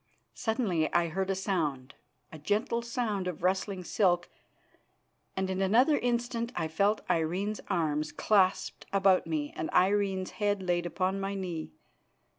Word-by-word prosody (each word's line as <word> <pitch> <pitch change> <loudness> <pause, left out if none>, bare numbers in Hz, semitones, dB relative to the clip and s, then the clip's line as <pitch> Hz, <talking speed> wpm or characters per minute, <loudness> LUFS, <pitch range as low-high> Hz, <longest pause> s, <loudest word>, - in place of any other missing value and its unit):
Suddenly 210 -9 0
I 170 -1 +3
heard 190 +4 -2
a 195 - +1
sound, 155 -9 -2 0.4
a 155 - -9
gentle 215 +8 0
sound 235 -5 -2
of 175 -2 -5
rustling 190 0 0
silk, 175 -2 +1 1.1
and 190 0 0
in 190 0 -2
another 245 +10 +4
instant 240 -1 -1
I 160 - -1
felt 200 +7 +1
Irene's 185 +6 0
arms 155 -5 0
clasped 195 -3 +1
about 195 -3 +3
me 150 -3 -2
and 160 - -3
Irene's 190 0 +2
head 205 -2 +1
laid 175 -1 0
upon 185 +3 -1
my 195 0 -2
knee. 175 -5 -5
190 Hz, 140 wpm, -30 LUFS, 175-205 Hz, 1.1 s, another